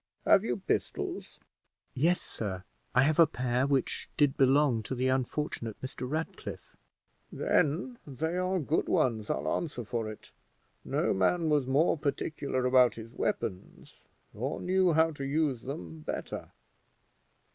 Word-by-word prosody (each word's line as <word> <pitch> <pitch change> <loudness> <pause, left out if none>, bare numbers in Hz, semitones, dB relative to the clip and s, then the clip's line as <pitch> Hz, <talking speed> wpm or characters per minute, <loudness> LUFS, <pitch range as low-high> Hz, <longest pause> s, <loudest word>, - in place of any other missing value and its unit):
Have - - +6
you - - -1
pistols?" - - -3 0.5
"Yes, 170 +7 +2
sir; 95 -4 -5 0.3
I 125 - +6
have 155 +3 +2
a 165 - +8
pair 125 -2 0
which 140 -2 0
did 145 -2 +3
belong 135 -3 +4
to 110 +5 -4
the 130 +1 +1
unfortunate 130 -3 -2
Mr. 130 -1 -6
Ratcliffe." 155 +3 -5 0.6
"Then 185 - +1
they 160 +5 -2
are 185 +1 0
good 155 -1 0
ones, 110 -4 +1
I'll 70 +3 -1
answer 145 -7 -4
for 115 -1 -3
it; 105 - -13 0.5
no - - 0
man 160 - +2
was 145 -4 +2
more 145 +4 +3
particular 140 -2 -2
about 125 -1 +5
his 115 0 -9
weapons, 100 -6 -4 0.3
or 130 +8 -3
knew 185 -1 +2
how 160 +1 +4
to 145 -3 -7
use 140 -3 0
them 90 - -7
better. 75 - -5
135 Hz, 140 wpm, -30 LUFS, 120-155 Hz, 0.6 s, a